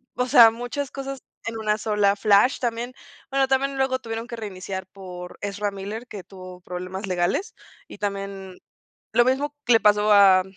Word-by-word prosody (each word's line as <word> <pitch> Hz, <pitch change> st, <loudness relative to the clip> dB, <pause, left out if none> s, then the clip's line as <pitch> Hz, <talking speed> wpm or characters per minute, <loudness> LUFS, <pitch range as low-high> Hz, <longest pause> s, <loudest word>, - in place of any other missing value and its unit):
o 250 Hz, -, 0 dB
sea, 235 Hz, -2 st, +8 dB
muchas 245 Hz, +5 st, -4 dB
cosas 275 Hz, 0 st, -6 dB, 0.3 s
en 230 Hz, 0 st, -4 dB
una 215 Hz, -1 st, 0 dB
sola, 210 Hz, -2 st, +2 dB
Flash 205 Hz, +4 st, +4 dB
también, 240 Hz, 0 st, -3 dB, 0.4 s
bueno, 270 Hz, -1 st, +2 dB
también 270 Hz, +1 st, 0 dB
luego 265 Hz, -1 st, +1 dB
tuvieron 225 Hz, -2 st, -5 dB
que 240 Hz, -, -6 dB
reiniciar 190 Hz, -3 st, -6 dB
por 180 Hz, -2 st, -10 dB
Ezra 205 Hz, 0 st, -2 dB
Miller, 200 Hz, +4 st, -7 dB
que 200 Hz, -5 st, -8 dB
tuvo 185 Hz, -1 st, -11 dB
problemas 185 Hz, +3 st, -6 dB
legales 180 Hz, -, -1 dB, 0.3 s
y -, -, -12 dB
también, 195 Hz, -2 st, -5 dB, 0.5 s
lo 240 Hz, -, +4 dB
mismo 275 Hz, +3 st, 0 dB
que 245 Hz, -, +5 dB
le 225 Hz, -, +6 dB
pasó 210 Hz, 0 st, +4 dB
a 195 Hz, -2 st, +7 dB
210 Hz, 170 wpm, -24 LUFS, 195-245 Hz, 0.5 s, sea